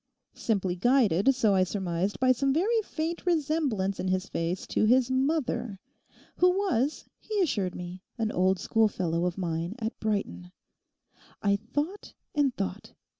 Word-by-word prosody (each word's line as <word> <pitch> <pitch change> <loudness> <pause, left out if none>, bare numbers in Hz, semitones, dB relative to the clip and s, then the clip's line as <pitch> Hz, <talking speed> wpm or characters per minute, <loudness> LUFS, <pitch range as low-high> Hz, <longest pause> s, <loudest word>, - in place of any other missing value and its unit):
Simply 195 -5 -1
guided, 240 +1 +3
so 220 -5 +3
I 190 -1 +4
surmised, 185 0 -2
by 255 0 +4
some 270 +2 +2
very 420 - +2
faint 335 -4 -4
resemblance 295 - 0
in - - -2
his 185 +1 0
face 170 +2 -2
to - - +1
his 255 +3 +4
mother, 260 -6 0 0.6
who 360 - +5
was, 295 - 0
he 430 -1 -3
assured 205 - 0
me, 180 +1 -7 0.2
an 220 -2 -1
old 185 +1 +2
schoolfellow 180 -6 +1
of 180 - -4
mine 170 +1 -2
at 225 -1 -4
Brighton. 145 - -2 0.9
I 200 0 +3
thought 290 - -4 0.2
and 290 -3 +2
thought. 195 +1 -4
215 Hz, 145 wpm, -28 LUFS, 185-275 Hz, 0.9 s, who